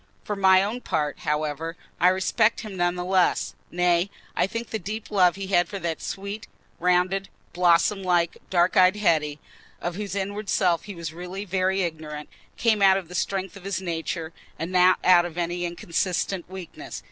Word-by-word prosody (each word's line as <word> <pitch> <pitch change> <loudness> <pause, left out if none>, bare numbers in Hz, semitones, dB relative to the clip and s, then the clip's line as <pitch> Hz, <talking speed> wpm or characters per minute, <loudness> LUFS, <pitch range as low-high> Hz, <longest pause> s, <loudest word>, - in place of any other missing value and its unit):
For 210 - -3
my 190 -1 +5
own 225 +5 -3
part, 150 -8 -2
however, 155 +2 -2 0.2
I 180 - +5
respect 190 +4 +2
him 215 -4 -7
none 175 -1 +1
the 180 0 -4
less—nay, 180 -1 +1 0.3
I - - +2
think 230 +3 -5
the 220 - -2
deep 210 +4 -6
love 180 -4 +4
he 195 0 -5
had 175 -3 +2
for 200 - -4
that 170 -4 -3
sweet, 200 +2 -5 0.3
rounded, 180 +2 +1 0.2
blossom 180 +3 +3
like, 175 -2 +1
dark 175 0 +2
eyed 185 +1 +6
Hetty, 155 -7 +1 0.4
of 175 - -3
whose 205 -1 -4
inward 200 +1 -3
self 175 -4 +2
he 205 - -7
was 165 -2 -6
really 180 +4 -6
very 190 0 +1
ignorant, 155 -3 -5 0.3
came 220 -3 +2
out 190 -1 +6
of 180 -4 -6
the - - -9
very 180 - +1
strength 195 -2 -3
of 200 - -11
his 195 -2 -2
nature 165 -2 -4 0.2
and 165 +3 -4
not 185 0 +5
out 180 -1 +6
of 175 -1 -7
any 175 0 -1
inconsistent 175 +1 -2
weakness. 185 -3 -8
180 Hz, 180 wpm, -25 LUFS, 170-195 Hz, 0.4 s, eyed